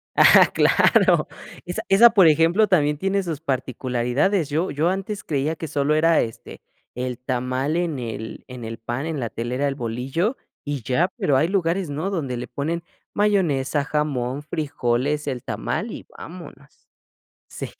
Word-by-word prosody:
Ah, - - +7
¡claro! - - +4 0.4
Esa 180 0 -4
esa, 225 +5 +7
por 195 -6 +5
ejemplo, 165 +7 +4
también 150 -6 +2
tiene 195 +2 0
sus 165 -5 -4
particularidades. 130 - -1
Yo 160 +6 0
yo 155 +4 0
antes 195 +2 -3
creía 150 +2 -1
que 160 -1 -6
solo 145 +1 +1
era, 165 +1 +4
este, 115 -1 -7 0.3
el 125 -1 -3
tamal 130 +4 -2
en 170 -5 -1
el 110 -2 -6
en 125 -2 -8
el 115 0 -6
pan, 120 +6 -4
en 155 -5 -3
la 115 - -2
telera, 125 +5 -2
el 135 - -4
bolillo 135 - -2 0.3
y 145 -5 -4
ya, 155 +10 +1
pero 140 -3 +2
hay 155 - +2
lugares, 185 -2 0
no, 155 +7 -3
donde 145 -10 -3
le 125 0 -5
ponen 165 +6 -3 0.3
mayonesa, 155 -9 +1
jamón, 145 -3 -2
frijoles, 145 -2 -1
el 130 -4 -3
tamal - - -3
y - - -8
vámonos. 150 -5 -12 0.6
Sí. - - -6
145 Hz, 160 wpm, -23 LUFS, 130-170 Hz, 0.6 s, Ah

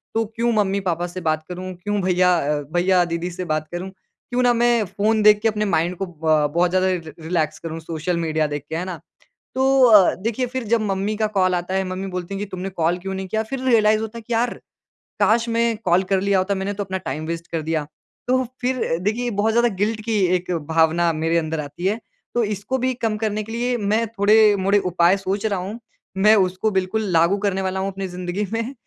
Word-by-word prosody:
तो 225 0 +2
क्यों 235 +1 +1
मम्मी-पापा 190 -4 0
से 180 +1 -7
बात 155 -1 0
करूँ, 185 +1 -6
क्यों 205 -1 -1
भईया, 180 -1 +3
अ, 150 -1 -1
भईया-दीदी 175 -1 +1
से 180 +1 -5
बात 155 0 -2
करूँ, 175 +2 -5
क्यों 245 +6 -6
ना 245 -1 +4
मैं 240 -1 +3
फ़ोन 210 +4 0
देख 210 0 +7
के 225 - +2
अपने 215 -1 0
माइंड 170 +3 0
को 195 - -2
ब 155 -3 +1
बहुत 175 +1 +3
ज़्यादा 185 0 +2 0.4
रिलैक्स 160 -2 -1
करूँ 165 -1 -6
सोशल 165 +2 -3
मीडिया 160 -2 0
देख 145 -1 -4
के, 160 - -3
है 175 +2 -2
ना। 180 -3 -6 0.6
तो 260 - 0 0.2
अ, 210 -6 +6
देखिए 230 +6 -2
फिर 255 0 -4
जब 230 +1 +2
मम्मी 200 0 -1
का 215 0 +1
कॉल 185 -1 +3
आता 180 +1 -2
है, 190 0 +1
मम्मी 185 +1 -4
बोलती 180 +1 -5
हैं - - -3
कि, - - -9
"तुमने 185 0 -4
कॉल 175 -1 0
क्यों 190 +2 -5
नहीं 190 0 -4
किया", 220 +3 0
फिर 255 +4 -5
रियलाइज़ 215 -4 +4
होता 220 +1 -6
है - - -9
कि 240 - -5
यार, 235 +1 +1 0.7
काश 220 +3 +3
मैं 230 -1 +1
कॉल 180 +1 +3
कर 190 -1 +3
लिया 200 0 +2
होता, 195 +2 0
मैंने 195 +1 -2
तो 205 0 -3
अपना 190 -1 -3
टाइम 150 +4 -4
वेस्ट 165 0 -4
कर 165 -1 -1
दिया। 155 -1 -2 0.4
तो 260 +1 +2 0.2
फिर 255 +1 0 0.2
देखिए 215 +6 -1
ये 240 - -1
बहुत 220 +1 +2
ज़्यादा 235 +1 +4
गिल्ट 215 +3 -1
की 225 -2 +1 0.2
एक 180 0 -3 0.2
भावना 165 +1 +3
मेरे 165 +2 0
अंदर 160 -1 -2
आती 145 +4 -6
है। 210 +4 0 0.4
तो 240 - +3
इसको 210 +4 -2
भी 255 0 0
कम 220 -2 +1
करने 215 -1 -2
के 220 - -10
लिए 245 +2 -1
मैं 215 +1 +1
थोड़े-मोड़े 205 -2 +4
उपाय 175 +2 +4
सोच 195 +2 -3
रहा 200 -3 0
हूँ। 200 +6 -6 0.4
मैं 210 +3 +6
उसको 190 +2 +1
बिल्कुल 190 +3 0
लागू 170 +4 +3
करने 195 -1 -1
वाला 190 0 -2
हूँ 195 +1 -2
अपनी 195 0 -5
ज़िन्दगी 180 +2 -3
में। 230 +4 -2
190 Hz, 225 wpm, -22 LUFS, 175-220 Hz, 0.7 s, देख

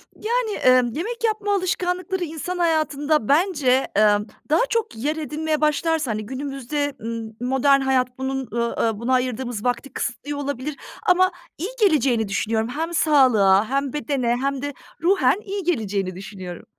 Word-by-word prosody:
Yani, 455 -1 -1 0.2
ımm, 240 -2 -1
yemek 465 +9 -4
yapma 425 -2 +1
alışkanlıkları, 365 0 -1
insan 330 +3 -4
hayatında, 310 -5 +1
bence, 285 -5 +3
emm, 210 0 +4 0.2
daha 315 - +4
çok 455 - -1
yer 290 +7 -1
edinmeye 310 0 -2
başlarsa, 305 -3 +1
hani, 215 0 -3
günümüzde 275 +3 -3
m 225 0 -5 0.2
modern 275 +1 +4
hayat 255 -1 +1
bunun, 265 -1 -3
ııı, 235 0 0
aaa, 220 -2 0
buna 245 +2 0
ayırdığımız 250 -3 -1
vakti 245 +2 -1
kısıtlıyor 285 +5 -4
olabilir 285 +1 -3 0.3
ama 370 +1 +5 0.3
iyi 370 +7 -3
geleceğini 270 - +3
düşünüyorum. 220 +3 -1
Hem 325 +5 -3
sağlığa, 225 - +4
hem 275 0 -1
bedene 265 -5 0
hem 275 0 -1
de 285 0 -3 0.3
ruhen 345 -5 +4
iyi 395 0 -4
geleceğini 205 - -1
düşünüyorum. 185 -2 -8
275 Hz, 145 wpm, -23 LUFS, 235-325 Hz, 0.3 s, ama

